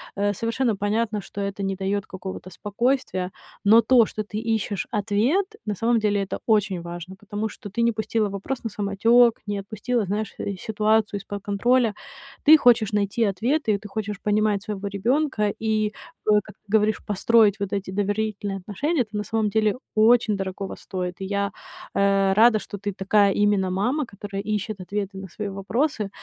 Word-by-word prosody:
э, 205 Hz, 0 st, +1 dB
совершенно 230 Hz, +2 st, 0 dB
понятно, 210 Hz, +1 st, -1 dB
что 200 Hz, -, -9 dB
это 200 Hz, 0 st, -3 dB
не 195 Hz, 0 st, -1 dB
даёт 195 Hz, +1 st, -2 dB
какого-то 185 Hz, -1 st, -7 dB
спокойствия, 205 Hz, -1 st, -1 dB, 0.3 s
но 220 Hz, +3 st, +7 dB
то, 240 Hz, -3 st, +5 dB
что 215 Hz, -, -4 dB
ты 210 Hz, +1 st, -5 dB, 0.2 s
ищешь 200 Hz, -3 st, -3 dB
ответ, 225 Hz, -, +1 dB, 0.2 s
на 210 Hz, -, -1 dB
самом 230 Hz, +3 st, +2 dB
деле, 205 Hz, -2 st, +1 dB
это 195 Hz, -, -5 dB
очень 205 Hz, -5 st, +2 dB
важно, 175 Hz, +2 st, -8 dB
потому 205 Hz, +2 st, -4 dB
что 205 Hz, -, -9 dB
ты 235 Hz, +4 st, -1 dB
не 235 Hz, -, +4 dB
пустила 215 Hz, -1 st, -1 dB
вопрос 200 Hz, +7 st, -4 dB
на 225 Hz, -, -3 dB
самотёк, 225 Hz, +4 st, +4 dB
не 205 Hz, -1 st, -2 dB
отпустила, 215 Hz, +3 st, -2 dB
знаешь, 205 Hz, +2 st, -3 dB
э, 200 Hz, -, -3 dB
ситуацию 215 Hz, -1 st, +1 dB
из-под 200 Hz, +1 st, -7 dB
контроля. 230 Hz, +2 st, +2 dB, 0.5 s
Ты 310 Hz, +1 st, +9 dB
хочешь 235 Hz, -6 st, +4 dB
найти 205 Hz, +3 st, +1 dB
ответы, 220 Hz, +3 st, +1 dB
ты 210 Hz, +1 st, -10 dB
хочешь 210 Hz, -1 st, -4 dB
понимать 210 Hz, -1 st, +1 dB
своего 205 Hz, -1 st, -4 dB
ребёнка 210 Hz, +1 st, 0 dB
и, 215 Hz, -1 st, 0 dB, 0.3 s
о, 210 Hz, -1 st, +4 dB
как -, -, -14 dB
ты 210 Hz, 0 st, -14 dB
говоришь, 215 Hz, 0 st, +2 dB
построить 210 Hz, 0 st, +3 dB
вот 200 Hz, -2 st, -3 dB
эти 195 Hz, -2 st, -3 dB
доверительные 205 Hz, 0 st, -2 dB
отношения. 260 Hz, -, -1 dB
Это 215 Hz, -1 st, -13 dB
на 210 Hz, -, -1 dB
самом 220 Hz, -1 st, 0 dB
деле 215 Hz, +1 st, +2 dB, 0.2 s
очень 220 Hz, -1 st, +4 dB
дорогого 195 Hz, 0 st, -4 dB
стоит. 180 Hz, -1 st, -5 dB
И 190 Hz, -, -2 dB
я, 200 Hz, 0 st, -1 dB, 0.4 s
э, 195 Hz, -1 st, +3 dB
рада, 220 Hz, +2 st, +6 dB
что 205 Hz, -, -8 dB
ты 205 Hz, 0 st, -3 dB
такая 195 Hz, +1 st, +3 dB
именно 205 Hz, -2 st, +2 dB
мама, 245 Hz, +11 st, 0 dB
которая 200 Hz, 0 st, -6 dB
ищет 210 Hz, 0 st, -3 dB
ответы 195 Hz, +1 st, -4 dB
на 190 Hz, 0 st, -7 dB
свои 205 Hz, +3 st, -5 dB
вопросы. 215 Hz, +3 st, -1 dB
205 Hz, 175 wpm, -24 LUFS, 200-220 Hz, 0.5 s, Ты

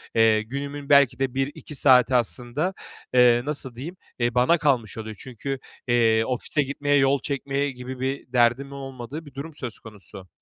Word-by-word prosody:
Eee, 110 Hz, -1 st, +4 dB
günümün 140 Hz, +5 st, -6 dB
belki 140 Hz, -3 st, +5 dB
de 135 Hz, -2 st, -1 dB
1-2 140 Hz, +2 st, -4 dB
saati 130 Hz, -2 st, +5 dB
aslında, 125 Hz, -, 0 dB, 0.4 s
eee, 120 Hz, -1 st, +5 dB
nasıl 140 Hz, -4 st, -2 dB
diyeyim, 160 Hz, +10 st, -7 dB, 0.2 s
eee, 120 Hz, 0 st, 0 dB
bana 125 Hz, +8 st, +4 dB
kalmış 130 Hz, -10 st, 0 dB
oluyor. 110 Hz, -1 st, -6 dB
Çünkü, 130 Hz, +2 st, -5 dB, 0.3 s
eee, 115 Hz, -2 st, +3 dB
ofise 130 Hz, +4 st, -1 dB
gitmeye, 145 Hz, +1 st, 0 dB
yol 135 Hz, 0 st, +3 dB
çekmeye 140 Hz, 0 st, -2 dB
gibi 125 Hz, 0 st, -8 dB
bir 130 Hz, -1 st, -4 dB
derdimin 125 Hz, +3 st, +2 dB
olmadığı 135 Hz, +2 st, -7 dB
bir 145 Hz, -, -14 dB
durum 145 Hz, +4 st, -7 dB
söz 120 Hz, -7 st, -6 dB
konusu. 100 Hz, -3 st, -12 dB
130 Hz, 160 wpm, -24 LUFS, 120-140 Hz, 0.4 s, belki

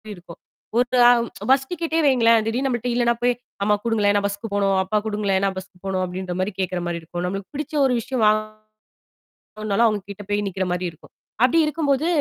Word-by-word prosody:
இருக்கும். 175 Hz, -2 st, -13 dB, 0.4 s
ஒரு 250 Hz, +1 st, +2 dB
அம் 235 Hz, -1 st, +3 dB, 0.2 s
பஸ் 270 Hz, 0 st, +3 dB
டிக்கட்டே 330 Hz, -2 st, -1 dB
வைங்களேன், 230 Hz, -4 st, +4 dB
திடீல்னு 250 Hz, +4 st, 0 dB
நம்மள்ட்ட 245 Hz, -1 st, -2 dB
இல்லனா 240 Hz, -1 st, +3 dB
போய் 245 Hz, -, +4 dB, 0.3 s
"அம்மா 210 Hz, +1 st, +3 dB
குடுங்களேன், 210 Hz, -3 st, +2 dB
நான் 200 Hz, -, 0 dB
பஸ்க்கு 200 Hz, +2 st, -5 dB
போணும், 195 Hz, -1 st, +2 dB
அப்பா 190 Hz, +3 st, -1 dB
குடுங்களேன், 205 Hz, -3 st, 0 dB
நான் 195 Hz, -1 st, -1 dB
பஸ்க்கு 190 Hz, -1 st, -9 dB
போணும்." 190 Hz, -1 st, -1 dB
அப்டின்ற 180 Hz, 0 st, -5 dB
மாரி 190 Hz, +2 st, -2 dB
கேட்கற 185 Hz, -1 st, -2 dB
மாரி 170 Hz, -1 st, -3 dB
இருக்கும். 175 Hz, +2 st, -6 dB
நம்மளுக்கு 195 Hz, +1 st, -5 dB
பிடிச்ச 300 Hz, +1 st, -5 dB
ஒரு 255 Hz, -, +2 dB
விஷயம் 240 Hz, 0 st, -2 dB
வாங்கணுனாலும் 215 Hz, 0 st, -2 dB, 1.1 s
அவுங்க 210 Hz, -3 st, -1 dB
கிட்ட 205 Hz, +1 st, -9 dB
போய் 205 Hz, 0 st, 0 dB
நிக்கிற 190 Hz, 0 st, -2 dB
மாரி 180 Hz, 0 st, -1 dB
இருக்கும். 160 Hz, -, -20 dB, 0.3 s
அப்டி 330 Hz, +6 st, +3 dB
இருக்கும்போது. 300 Hz, -1 st, 0 dB
215 Hz, 185 wpm, -22 LUFS, 190-245 Hz, 1.1 s, வைங்களேன்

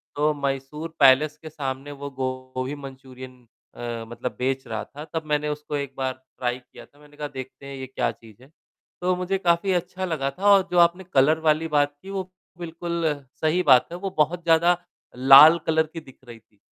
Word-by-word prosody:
तो 150 Hz, +1 st, +2 dB
मैसूर 140 Hz, +3 st, -4 dB
पैलेस 145 Hz, +3 st, +5 dB
के 160 Hz, -, -8 dB
सामने 135 Hz, -1 st, -5 dB
वो 140 Hz, 0 st, -7 dB
गोभी 130 Hz, +1 st, -4 dB
मंचूरियन 130 Hz, -2 st, -11 dB, 0.4 s
अ, 120 Hz, -1 st, -5 dB
मतलब 120 Hz, +2 st, -6 dB
बेच 130 Hz, +1 st, -1 dB
रहा -, -, -4 dB
था। 145 Hz, +2 st, -10 dB
तब 160 Hz, -1 st, -3 dB
मैंने 150 Hz, 0 st, 0 dB
उसको 150 Hz, 0 st, -5 dB
एक 140 Hz, -1 st, -5 dB
बार 130 Hz, -1 st, -1 dB
ट्राई 130 Hz, -1 st, -5 dB
किया 125 Hz, -, -15 dB
था। 145 Hz, -, -27 dB
मैंने 150 Hz, 0 st, -19 dB
कहा, 150 Hz, -1 st, -4 dB
"देखते 130 Hz, 0 st, -9 dB
हैं, 140 Hz, 0 st, -7 dB
ये 130 Hz, -, -6 dB
क्या 130 Hz, -, -1 dB
चीज़ 110 Hz, 0 st, -18 dB
है।" 135 Hz, -, -18 dB, 0.5 s
तो 180 Hz, +1 st, +1 dB
मुझे 180 Hz, +2 st, -1 dB
काफ़ी 175 Hz, +1 st, +1 dB
अच्छा 180 Hz, +1 st, -2 dB
लगा 155 Hz, -6 st, -2 dB
था 185 Hz, +9 st, -7 dB
और 195 Hz, -2 st, +5 dB
जो 180 Hz, -, 0 dB
आपने 170 Hz, +2 st, +4 dB
कलर 150 Hz, +4 st, +4 dB
वाली 155 Hz, +1 st, +2 dB
बात 145 Hz, -2 st, +1 dB
की, 195 Hz, -, -11 dB
वो 190 Hz, -2 st, -5 dB, 0.3 s
बिल्कुल 170 Hz, 0 st, -4 dB, 0.4 s
सही 160 Hz, +3 st, +2 dB
बात 125 Hz, -1 st, +6 dB
है। 175 Hz, -, -5 dB
वो 195 Hz, +2 st, -4 dB
बहुत 165 Hz, +3 st, +1 dB
ज़्यादा 170 Hz, +1 st, +4 dB, 0.4 s
लाल 135 Hz, +5 st, +9 dB
कलर 160 Hz, 0 st, +2 dB
की 165 Hz, -, -5 dB
दिख 135 Hz, -5 st, -16 dB
रही 115 Hz, -1 st, -11 dB
थी, 105 Hz, -2 st, -37 dB
145 Hz, 200 wpm, -24 LUFS, 130-165 Hz, 0.5 s, लाल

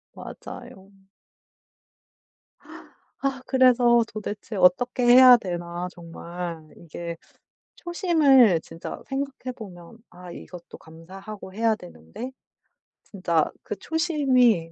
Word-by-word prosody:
맞아요. 190 Hz, +1 st, -11 dB, 2.3 s
아 270 Hz, -1 st, -2 dB
그래서 245 Hz, -2 st, +4 dB
도대체 210 Hz, 0 st, -7 dB
어떻게 195 Hz, +8 st, +2 dB
해야 250 Hz, 0 st, +9 dB
되나 175 Hz, -2 st, -5 dB
정말. 170 Hz, -1 st, -8 dB
이게 170 Hz, 0 st, -8 dB, 0.6 s
초심을 295 Hz, -, +3 dB
진짜 165 Hz, +1 st, -9 dB
생각해 270 Hz, -2 st, -5 dB
보면 190 Hz, 0 st, -12 dB
아 180 Hz, 0 st, -12 dB
이것도 175 Hz, 0 st, -11 dB
감사하고 190 Hz, +5 st, -11 dB
해야 225 Hz, 0 st, +2 dB
되는데 180 Hz, -, -10 dB, 0.7 s
진짜 170 Hz, -5 st, -1 dB
그 -, -, -5 dB
초심이 255 Hz, -, +1 dB
205 Hz, 205 characters per minute, -24 LUFS, 175-255 Hz, 2.3 s, 해야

